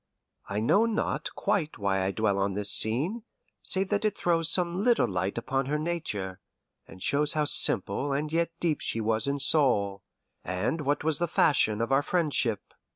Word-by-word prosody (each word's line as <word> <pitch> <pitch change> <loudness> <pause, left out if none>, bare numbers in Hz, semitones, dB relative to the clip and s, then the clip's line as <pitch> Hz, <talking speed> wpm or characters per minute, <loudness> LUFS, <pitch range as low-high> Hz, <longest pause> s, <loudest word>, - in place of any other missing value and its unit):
I 100 +1 -2
know 200 - +3
not 225 -1 -2
quite 160 -7 -1
why 95 -2 0
I 95 - 0
dwell 100 0 0
on 100 0 -1
this 100 0 +1
scene, 145 - +2 0.4
save 190 0 +1
that 205 0 0
it 210 -2 -1
throws 165 -2 0
some 180 +1 0
little 240 0 +3
light 95 +2 -3
upon 135 +3 -2
her 150 +2 0
nature, 130 - -4 0.5
and 95 - -11
shows 150 +1 +2
how 150 -1 0
simple 120 0 +2
and 150 +3 -2
yet 170 0 +1
deep 160 -4 -1
she 115 - -2
was 110 +3 0
in 140 0 0
soul, 125 -9 +2 0.4
and 95 - -2
what 145 +1 -1
was 155 -2 +1
the 175 - 0
fashion 125 -10 +2
of 115 - -2
our 135 +1 +4
friendship. 145 - 0
140 Hz, 180 wpm, -27 LUFS, 105-165 Hz, 0.5 s, our